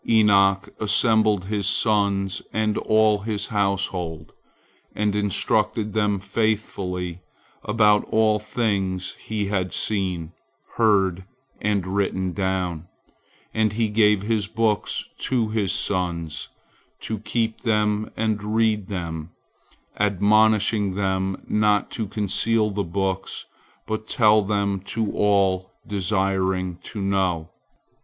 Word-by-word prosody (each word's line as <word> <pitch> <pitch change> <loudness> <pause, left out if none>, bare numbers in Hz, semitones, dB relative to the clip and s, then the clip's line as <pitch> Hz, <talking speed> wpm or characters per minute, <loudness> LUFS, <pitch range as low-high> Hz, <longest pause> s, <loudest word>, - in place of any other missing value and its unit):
Enoch 100 -3 +4
assembled 110 -2 +3
his 100 -1 -1
sons 100 -2 +1
and 110 -1 0
all 110 -1 +3
his 105 0 -3
household, 95 -6 -2 0.6
and 105 -1 0
instructed 105 +1 0
them 105 -2 +1
faithfully 95 -4 -2 0.4
about 105 -1 +3
all 110 -1 +2
things 100 -4 -2
he 110 -2 -3
had 95 -2 -1
seen, 90 -6 -2 0.5
heard, 95 -5 +3 0.4
and 105 -3 0
written 95 -1 -1
down, 90 -4 -2 0.7
and 110 -2 +1
he 110 0 0
gave 105 -2 +3
his 105 -2 0
books 110 -1 0 0.2
to 120 -4 0
his 105 -4 0
sons, 90 -5 -2 0.5
to 110 -2 -4
keep 110 +1 -2
them 105 -2 +1
and 105 -1 -1
read 110 -3 +2
them, 85 -4 -5 0.7
admonishing 105 0 +3
them 95 -1 -1
not 105 -1 +2
to 110 -3 -3
conceal 105 +2 0
the 100 0 -1
books, 95 +2 -3 0.4
but 110 0 -4
tell 110 -4 +4
them 100 -1 0
to 110 +3 -2
all 95 -2 +2 0.2
desiring 95 -2 0
to 105 - -7
know. 95 -5 0
100 Hz, 110 wpm, -23 LUFS, 95-110 Hz, 0.7 s, Enoch